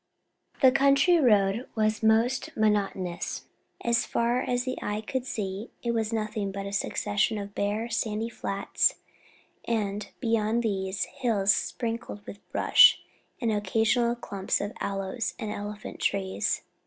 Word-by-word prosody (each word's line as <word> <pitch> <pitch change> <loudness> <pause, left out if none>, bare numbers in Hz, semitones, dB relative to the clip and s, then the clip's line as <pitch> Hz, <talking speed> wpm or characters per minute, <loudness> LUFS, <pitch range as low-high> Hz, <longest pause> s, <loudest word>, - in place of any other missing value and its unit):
The 260 - +8
country 275 +6 +4
round 210 -3 +3
was 215 0 +1
most 225 +4 +2
monotonous. 200 -5 0 0.4
As 235 0 +2
far 240 +2 0
as 245 0 -1
the 255 0 -3
eye 210 +1 -2
could 260 +3 -3
see 200 0 -4
it 235 - 0
was 225 -1 -1
nothing 215 -2 -2
but 195 0 -5
a 200 - -6
succession 205 +2 0
of 200 0 -6
bare, 205 +3 -1
sandy 225 -1 -1
flats, 235 - 0 0.7
and, 210 -3 -2
beyond 230 -1 +1
these, 190 -3 -1
hills 220 -7 +1
sprinkled 230 -4 -4
with 200 - -9
bush - - +7 0.4
and 230 -3 0
occasional 225 +4 +1
clumps 200 -5 -2
of 205 +1 -4
aloes 195 +3 -3
and 215 -3 -4
elephant 205 +1 -6
trees. 190 -1 -1
215 Hz, 135 wpm, -27 LUFS, 200-235 Hz, 0.7 s, The